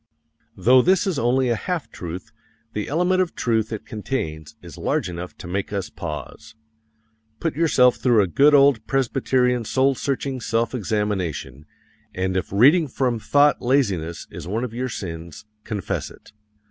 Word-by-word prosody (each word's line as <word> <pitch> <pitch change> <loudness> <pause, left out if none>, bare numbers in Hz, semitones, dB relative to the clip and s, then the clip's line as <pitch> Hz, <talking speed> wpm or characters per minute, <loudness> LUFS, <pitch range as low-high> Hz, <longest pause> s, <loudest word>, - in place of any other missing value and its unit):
Though 130 +2 +5
this 190 - +3
is 185 -7 -1
only 125 +2 +2
a 120 - +2
half 170 +7 -4
truth, 85 +1 -7 0.4
the 105 - -3
element 180 +5 +2
of 180 -2 -2
truth 110 -2 0
it 110 - -5
contains 80 - -4
is - - -12
large - - -1
enough 90 0 -7
to - - -10
make 95 +3 -3
us 100 -2 -3
pause. 85 +7 -7 0.8
Put 165 - -2
yourself 135 -6 +4
through 120 -5 +3
a - - -1
good 145 - +5
old 140 -6 +4
Presbyterian 125 -2 +1
soul 130 +4 +2
searching 135 -1 -3
self 115 +2 0
examination, 95 - -3 0.5
and 95 0 -1
if 95 - -2
reading 145 - +5
from 125 -3 -1
thought 145 +7 +3
laziness 100 - 0
is - - -8
one 110 +6 -2
of 120 -3 -4
your 125 +2 -3
sins, 85 -3 -7 0.2
confess 105 -5 -3
it. - - -17
115 Hz, 160 wpm, -22 LUFS, 95-135 Hz, 0.8 s, Though